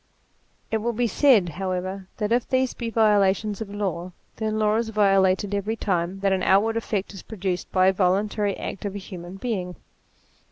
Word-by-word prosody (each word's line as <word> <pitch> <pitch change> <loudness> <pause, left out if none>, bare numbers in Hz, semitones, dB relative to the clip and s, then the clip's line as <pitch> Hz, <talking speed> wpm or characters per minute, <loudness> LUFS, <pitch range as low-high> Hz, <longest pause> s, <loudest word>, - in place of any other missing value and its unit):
It 220 - +2
will 235 +2 -1
be 240 +2 0
said, 230 -7 +4
however, 185 +2 -4
that 210 -1 -2
if 240 +1 +1
these 260 -1 +1
be 235 -2 -4
violations 210 -2 +2
of 215 - -5
law, 185 -3 -3 0.2
then 215 -1 -1
law 215 0 +2
is 230 -1 -1
violated 195 -2 +2
every 205 +2 -1
time 185 -2 -2
that 195 -1 +2
any 185 -1 0
out 195 +2 +5
ward 225 0 -1
effect 210 -4 -2
is 195 - -9
produced 190 -4 -4
by 185 -1 +3
a 190 - +5
voluntary 200 +2 +1
act - - -6
of 200 -1 -4
a - - -2
human 185 -2 -8
being. 195 -5 -3
200 Hz, 190 wpm, -24 LUFS, 185-220 Hz, 0.2 s, out